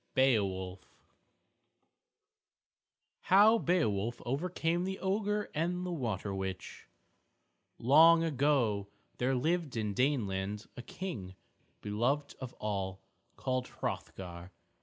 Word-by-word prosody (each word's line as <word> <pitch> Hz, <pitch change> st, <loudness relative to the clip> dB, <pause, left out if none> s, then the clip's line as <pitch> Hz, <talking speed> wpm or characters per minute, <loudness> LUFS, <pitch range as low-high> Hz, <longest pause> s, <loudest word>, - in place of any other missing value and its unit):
MARSHALL 95 Hz, -8 st, +2 dB
I -, -, -27 dB, 2.4 s
HOW 210 Hz, +4 st, +7 dB
BEOWULF 120 Hz, -, 0 dB
OVERCAME 165 Hz, +5 st, -1 dB
THE 190 Hz, +1 st, -3 dB
OGRE 210 Hz, +2 st, -1 dB
AND 175 Hz, +4 st, -1 dB
THE 180 Hz, -, -3 dB
WATER 110 Hz, -, -2 dB
WITCH 95 Hz, -1 st, -5 dB, 0.9 s
Long 165 Hz, +6 st, +6 dB
ago, 135 Hz, -9 st, +1 dB, 0.3 s
there 130 Hz, +2 st, +2 dB
lived 155 Hz, 0 st, 0 dB
in 105 Hz, -2 st, -1 dB
Daneland 105 Hz, -5 st, 0 dB
a -, -, -6 dB
King, 115 Hz, -, -6 dB, 0.5 s
beloved 125 Hz, +8 st, 0 dB
of 130 Hz, -2 st, -7 dB
all, 95 Hz, -3 st, -3 dB, 0.3 s
called 130 Hz, -1 st, -2 dB
Hrothgar. 90 Hz, -1 st, -6 dB
130 Hz, 95 wpm, -32 LUFS, 100-165 Hz, 2.4 s, HOW